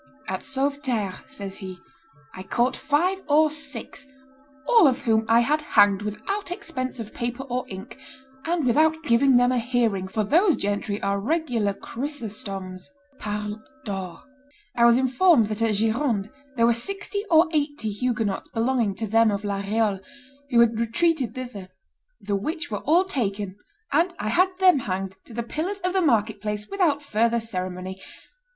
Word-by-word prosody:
"At - - -3
Sauveterre," 265 -8 -2
says 195 -1 -8
he, 185 -2 -7 0.6
"I 185 - -8
caught 240 +7 0
five 360 +6 0
or 305 +1 +5
six, 280 -3 -7 0.6
all 460 -9 +7
of 255 - +1
whom 220 -1 +2
I 230 +1 +5
had 300 +6 +1
hanged 205 -8 +4
without 355 - -4
expense 320 - -4
of 220 -2 -7
paper 240 +2 -4
or 250 -1 -3
ink, 190 0 -9 0.5
and 330 -3 0
without 315 +6 +3
giving 260 -1 +4
them 245 +1 +4
a 250 - +1
hearing, 230 -6 0
for 215 +3 -1
those 335 - +4
gentry 205 +1 -2
are 200 0 0
regular 235 -6 0
Chrysostoms 205 -9 -5 0.3
(parlent 210 0 -4 0.2
d'or)." 190 -4 -5 0.5
"I 235 - +4
was 235 0 +6
informed 260 - +4
that 215 +1 -4
at 225 -2 +2
Gironde 220 -1 0 0.2
there 230 -2 +3
were 235 - +5
sixty 395 - -3
or 325 +1 +6
eighty 290 -7 -1
Huguenots 225 -2 -2
belonging 230 -3 0
to 225 - -3
them 225 +2 +4
of 200 0 -2
La 200 -1 -1
Reole, 205 0 0 0.5
who 240 -3 +5
had 230 -1 +3
retreated 260 +3 +1
thither; 240 -8 -7 0.5
the 200 - -2
which 315 - -3
were - - -3
all 340 +5 +5
taken, 205 - -3 0.4
and 340 +5 +2
I 215 - -3
had 365 - +4
them 370 -6 +5
hanged 190 -3 -4
to 235 - -13
the 235 - -2
pillars 330 - -3
of 365 0 -1
the 380 - +2
market 220 - +1
place 210 0 -3
without 330 -8 +1
further 235 -2 +1
ceremony. 185 -3 -4
235 Hz, 160 wpm, -24 LUFS, 205-295 Hz, 0.6 s, all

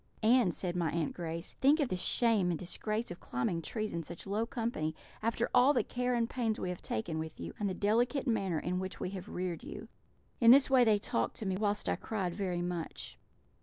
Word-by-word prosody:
"'And,' 230 -3 +5
said 175 +3 -3
my 170 -2 +1
Aunt 165 -1 -1
Grace, 165 0 -5
'think 285 +4 +5
of 280 -5 +1
the - - -1
shame 210 0 +2
and 170 - 0
disgrace 215 +6 -3
of 175 - -7
climbing 145 +7 -2
trees 215 +5 -3
in 170 - -2
such 170 +1 -8
low 210 +3 -1
company, 225 - -2 0.3
after 230 +1 0
all 265 +4 +6
the 255 - +2
care 250 0 -1
and 230 -1 +1
pains 230 -3 -1
we 185 - -2
have 180 - -5
taken 155 +9 -3
with 160 0 -6
you, - - -6
and 205 -1 0
the 185 - -3
delicate 240 +7 +1
manner 200 - 0
in 180 +4 -1
which 185 0 -5
we 180 - -3
have 185 -2 -7
reared 180 0 -3
you!' 305 +7 -8 0.5
"In 230 - +6
this 270 +2 +7
way 260 -2 +7
they 220 -3 +4
talked 115 - -1
to 220 - -5
me, 190 -1 0
whilst 205 +1 0
I - - +1
cried 190 -6 -2
very 180 -3 -2
much. 175 -2 -5
200 Hz, 225 wpm, -32 LUFS, 175-230 Hz, 0.5 s, this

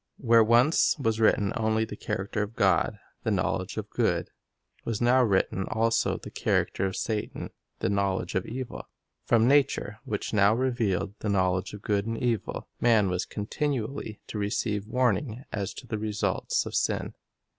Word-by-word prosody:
Where 115 -2 +5
once 120 +11 +4
was 115 -6 0
written 105 -3 +3
only 110 0 +1
the 105 - -8
character 100 +1 -3
of 105 +2 -4
God, - - +2 0.2
the - - -1
knowledge - - -1
of - - -3
good, - - 0 0.5
was 115 -3 -2
now 125 +2 +4
written 95 -4 +1
also 115 +1 +1
the - - -10
character 95 - 0
of 95 - -4
Satan, 110 -2 -3 0.3
the - - +1
knowledge 100 -3 0
of 95 - -1
evil. 130 +1 -6 0.4
From 115 -1 +4
nature, 135 -6 +2
which 110 -6 -4
now 105 +1 +5
revealed 115 -7 0
the 105 - -3
knowledge 95 0 +1
of 105 - -12
good 100 0 0
and 115 0 -2
evil, 115 -6 -2
man 110 -5 +4
was 90 0 -1
continually 115 0 -3
to 105 - -5
receive 105 0 -1
warning 125 0 0
as 100 -3 -2
to - - -9
the 110 - -3
results 105 -3 -1
of - - -6
sin. - - 0
110 Hz, 165 wpm, -27 LUFS, 100-120 Hz, 0.5 s, Where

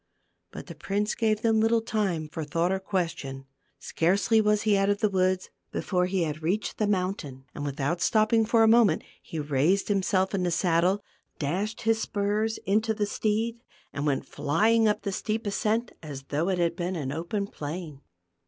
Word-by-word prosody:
But - - -9
the - - -9
prince 205 +2 -1
gave 220 -1 0
them 225 -1 +3
little 225 +1 +3
time 195 -9 -1
for 160 +1 -5
thought 165 +4 0
or 190 - 0
question. 165 -8 -3 0.3
Scarcely 200 +6 +2
was 210 -1 +2
he 215 -1 +3
out 195 0 +2
of 205 0 +1
the 210 -1 +1
woods 185 0 +1 0.2
before 180 -2 0
he 185 -1 0
had 155 0 -3
reached 190 +7 -2
the 215 - +2
moun 190 -2 +1
tain, 135 -8 -10
and 145 - -6
without 145 +4 -2
stopping 220 +1 +3
for 225 +1 +3
a - - +5
moment, 220 -7 +4 0.2
he 165 - -8
raised 150 +8 +1
himself 195 -1 +1
in 195 - 0
the 180 - +1
saddle, 180 +3 +2 0.3
dashed 195 +9 -2
his 225 0 +1
spurs 210 +2 -1
into 220 +3 +1
the 210 -1 0
steed, 225 +3 -1 0.3
and 145 +1 -2
went 140 -2 0
flying 220 +10 +2
up 210 - 0
the 200 - -2
steep 220 +3 -2
ascent 220 +3 0
as 145 -4 -7
though 155 +5 0
it 185 - +1
had 170 -1 +1
been 180 +2 -2
an 140 -5 -3
open 170 +7 -2
plain. 155 -4 -7
195 Hz, 190 wpm, -27 LUFS, 165-215 Hz, 0.3 s, a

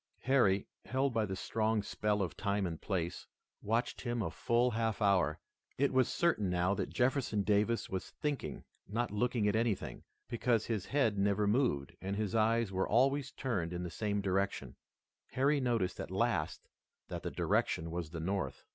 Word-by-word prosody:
Harry, 120 -8 +3 0.2
held 130 0 0
by 110 -2 +1
the 95 - -3
strong 110 +1 0
spell 105 -1 0
of 90 - -4
time 100 -2 0
and 80 -3 -4
place, 90 -4 -2 0.3
watched 115 +4 -1
him 120 -1 -2
a - - -3
full 120 +1 +2
half 110 0 -1
hour. 95 -8 +3 0.4
It 140 0 +2
was 130 -1 +4
certain 160 - +1
now 90 +2 +2
that - - -2
Jefferson 125 -5 +1
Davis 105 +3 +2
was 95 -1 -4
thinking, 145 -3 -3 0.2
not 115 +3 -1
looking 110 0 +1
at 105 - +2
anything, 110 -3 -1 0.2
because 115 -1 +1
his 110 -5 -2
head 120 -8 +2
never 100 +1 +2
moved, 105 - +1
and 95 +1 -2
his 105 -2 -2
eyes 115 -1 +2
were 95 0 0
always 135 +4 +3
turned 95 -11 -2
in 90 0 -3
the 90 - -5
same 105 +2 -1
direction 95 0 -1 0.6
Harry 140 +3 +3
noticed 120 -8 0
at - - -4
last 95 -5 -1 0.4
that - - -4
the - - -3
direction 80 +1 0
was 85 -2 -3
the 85 +1 -6
North. 95 +4 -2
105 Hz, 175 wpm, -33 LUFS, 95-120 Hz, 0.6 s, was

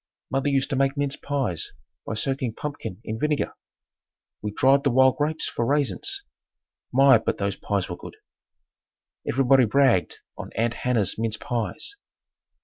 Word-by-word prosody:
Mother 135 +2 +1
used 140 +1 +1
to - - +1
make 135 +1 +1
mince 140 -1 0
pies 130 - -2 0.3
by 110 - -2
soaking 130 -1 -2
pumpkin 145 -11 -5
in 110 +1 -4
vinegar. 150 +1 0 0.9
We 105 - -2
dried 135 +5 +4
the 140 - +3
wild 130 +1 +4
grapes 155 +2 -1
for - - -2
raisins. 135 -6 0 0.7
My, 135 -2 +6
but - - -2
those 100 -1 -1
pies 100 -3 -2
were 85 - -6
good. - - -10 1.1
Everybody 135 0 +4
bragged 115 - +3 0.2
on - - -6
"Aunt 115 +1 0
Hannah's 115 -6 0
mince 110 -1 0
pies." 120 - -3
130 Hz, 145 wpm, -25 LUFS, 110-140 Hz, 1.1 s, My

